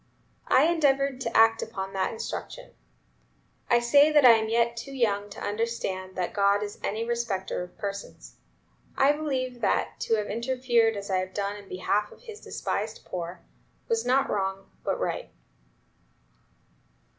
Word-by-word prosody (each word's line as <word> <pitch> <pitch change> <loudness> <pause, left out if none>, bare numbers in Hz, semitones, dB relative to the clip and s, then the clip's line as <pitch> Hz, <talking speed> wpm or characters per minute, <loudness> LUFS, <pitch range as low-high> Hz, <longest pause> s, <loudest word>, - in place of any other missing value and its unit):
I 260 - +5
endeavored 275 -5 +2
to 230 -2 -1
act 225 0 +5
up - - -5
to 195 -3 -5
that 190 -1 0
instruction. - - -6 1.0
I 240 - +6
say 285 +6 +5
that 295 -3 +5
I 245 - +11
am 220 -1 +3
yet 235 +1 +2
too 255 +4 -7
young 205 -5 0
to 200 - -10
understand 205 -4 -3
that 180 -1 -2
God 200 0 +3
is 205 0 -7
any 220 +3 -2
respecter 230 -7 -2
of 180 0 -9
persons. 200 -1 -7 0.6
I 270 +1 +5
believe 260 -5 -3
that, 210 - 0
to 225 - +1
have 210 -1 -1
interfered 235 -1 +1
as 200 0 -5
I 190 - +2
have 185 0 -3
done 200 0 -2
in 205 -1 -12
behalf 205 +3 -1
of - - -16
His 440 -3 -10
despised - - -4
poor, 175 0 -6 0.5
was 455 -1 +1
not 270 +2 +2
wrong, 195 -1 -2
but - - -1
right." - - -3
225 Hz, 160 wpm, -27 LUFS, 200-255 Hz, 1.0 s, I